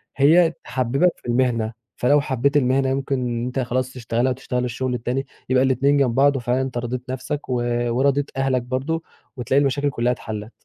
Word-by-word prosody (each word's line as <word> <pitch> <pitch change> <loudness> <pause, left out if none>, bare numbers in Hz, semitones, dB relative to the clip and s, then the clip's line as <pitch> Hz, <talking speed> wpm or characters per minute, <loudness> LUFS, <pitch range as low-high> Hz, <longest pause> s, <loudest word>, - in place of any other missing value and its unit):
هي 165 +5 +5
تحبِّبَك 135 +8 +1
في - - -14
المهنة، 120 -2 +1 0.2
فلو 145 +4 +3
حبّيت 140 +1 +1
المهنة 135 0 +2
يمكن 135 +1 -1
إن 120 -1 -2
أنت 125 +2 -3
خلاص 130 +1 -1
تشتغلها 120 +1 -1
وتشتغل 125 -1 -2
الشُغل 125 +1 -2
التاني، 125 +3 -2 0.2
يبقى 130 0 +4
الاتنين 135 +2 +3
جنب 130 -4 +2
بعض 140 +1 +4
وفعلًا 125 +1 0
أنت 130 -2 -3
رضيت 120 +1 -3
نَفْسك 130 +3 -4
و - - 0 0.4
ورضيت 140 +3 +1
أهلك 135 -2 +1
برضه 135 +7 -2 0.3
وتلاقي 130 +4 +2
المشاكل 140 +1 +1
كُلّها 125 -2 0
اتحلَّت. 110 -1 -6
130 Hz, 175 wpm, -22 LUFS, 125-140 Hz, 0.4 s, هي